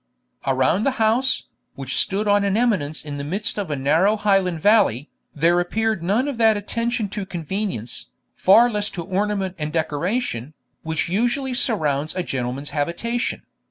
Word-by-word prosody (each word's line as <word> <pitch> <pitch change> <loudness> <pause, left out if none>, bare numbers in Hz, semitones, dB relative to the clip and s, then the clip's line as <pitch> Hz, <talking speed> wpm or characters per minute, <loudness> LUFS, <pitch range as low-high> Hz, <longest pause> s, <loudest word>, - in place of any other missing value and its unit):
Around 135 +9 +2
the 270 0 0
house, 230 +4 +2 0.3
which 135 -2 -4
stood 205 +2 +1
on 205 0 +4
an 200 +1 +1
eminence 175 -12 0
in 145 -1 -5
the - - -4
midst 195 +8 -2
of 195 -5 -3
a 150 - -1
narrow 160 +10 +3
Highland 195 -5 +1
valley, 195 - +3 0.2
there 170 +4 +3
appeared 220 +2 0
none 210 +10 +1
of 275 -5 -4
that 220 -2 +5
attention 230 +2 -2
to 205 0 -4
convenience, 180 - -4 0.3
far 220 +6 +6
less 210 -1 -1
to 175 -3 -6
ornament 195 0 -1
and 150 0 -3
decoration, 155 - -2 0.3
which 160 -1 -2
usually 245 +8 0
surrounds 155 - 0
a 185 - -1
gentleman's 130 -1 -3
habitation. 170 - -2
190 Hz, 160 wpm, -22 LUFS, 155-220 Hz, 0.3 s, far